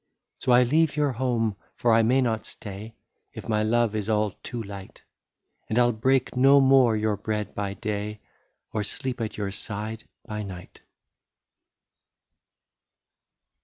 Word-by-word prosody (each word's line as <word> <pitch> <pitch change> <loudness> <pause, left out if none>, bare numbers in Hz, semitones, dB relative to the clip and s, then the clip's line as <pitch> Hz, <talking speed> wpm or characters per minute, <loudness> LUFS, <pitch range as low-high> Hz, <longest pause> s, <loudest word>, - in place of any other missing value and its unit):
" - - -57
So 125 - 0
I 125 +1 +7
leave 155 +4 +2
your 145 -2 +2
home, 120 -4 0
— - - -40
for 120 -2 +2
I 115 - +6
may 125 +4 +3
not 110 -3 -1
stay. 105 +1 -9 0.4
If - - -9
my 110 -1 +1
love 115 0 +2
is 105 0 -2
all 105 -1 +2
too 120 -2 -5
light 100 -2 -10 0.3
— - - -50
And 110 - -1
I 125 - +6
'11 120 -2 0
break 130 +2 +2
no 135 +3 +6
more 130 -4 +5
your 105 -1 +1
bread 105 +1 -3
by 100 -1 -3
day, 105 -1 -4 0.5
Or 110 - 0
sleep 125 +4 -4
at 110 - -4
your 100 -2 -2
side 105 +2 -5 0.2
by 105 -1 -4
night. 95 -3 -9
110 Hz, 165 wpm, -26 LUFS, 105-125 Hz, 0.5 s, I